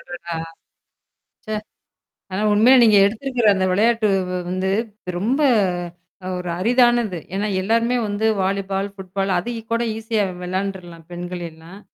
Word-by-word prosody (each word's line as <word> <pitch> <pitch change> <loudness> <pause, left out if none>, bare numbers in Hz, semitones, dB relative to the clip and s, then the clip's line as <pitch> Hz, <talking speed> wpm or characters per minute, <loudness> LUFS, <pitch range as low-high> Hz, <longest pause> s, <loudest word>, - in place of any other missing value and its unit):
அடடா! 170 -1 -7 1.1
சே! 215 - -3 0.8
ஆனா, 190 - -2
உண்மையில 245 +5 +6
நீங்க 215 -3 +6
எடுத்திருக்கிற 240 +2 0
அந்த 190 -1 0
விளையாட்டு 220 +3 +3 0.2
வ் 180 - -2
வந்து 185 +1 -1 0.5
ரொம்ப 245 +10 0 1.0
ஒரு 180 -1 -5
அரிதானது. 240 -3 +3 0.2
ஏன்னா 205 +2 -1
எல்லாருமே 230 +5 +1
வந்து 205 +2 -2 0.2
வாலிபால், 195 +1 -1
ஃபுட்பால் 195 0 -3
அதுக்கு 230 +5 -3
கூட 230 +1 +1
ஈஸியா 220 -1 -1 0.2
விளையாண்டுர்லாம் 180 -3 -5
பெண்கள் 175 0 -6
எல்லாம். 165 +5 -14
200 Hz, 120 wpm, -21 LUFS, 185-230 Hz, 1.1 s, உண்மையில